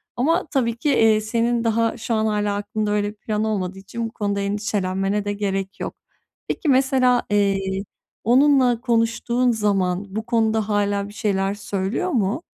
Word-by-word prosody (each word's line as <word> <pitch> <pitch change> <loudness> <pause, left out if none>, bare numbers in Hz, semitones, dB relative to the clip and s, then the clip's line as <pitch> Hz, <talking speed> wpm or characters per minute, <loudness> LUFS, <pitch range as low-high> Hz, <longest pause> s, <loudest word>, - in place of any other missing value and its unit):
Ama 315 +8 +1
tabii 235 -5 0
ki, 290 - -1
eee, 220 -5 +4
senin 230 +2 0
daha 230 0 +1
şu 230 0 -3
an 220 -1 +1
hâlâ 210 -1 0
aklında 205 +1 -2
öyle 205 0 +1
bir 210 - -11
plan 210 0 -2
olmadığı 195 -3 -2
için 230 +4 -5
bu - - -19
konuda 200 -1 -2
endişelenmene 200 0 -1
de 205 - -1
gerek 195 -1 -3
yok. - - -5 0.5
Peki, 310 - -2
mesela, 260 -2 +3
eee, 200 -1 +2 0.6
onunla 255 0 +4
konuştuğun 235 +1 +1
zaman 200 -4 0
bu 220 0 -3
konuda 220 -2 +1
hâlâ 205 -1 0
bir 205 - -12
şeyler 195 -2 0
söylüyor 205 - -2
mu? 230 - 0
215 Hz, 160 wpm, -22 LUFS, 200-235 Hz, 0.6 s, eee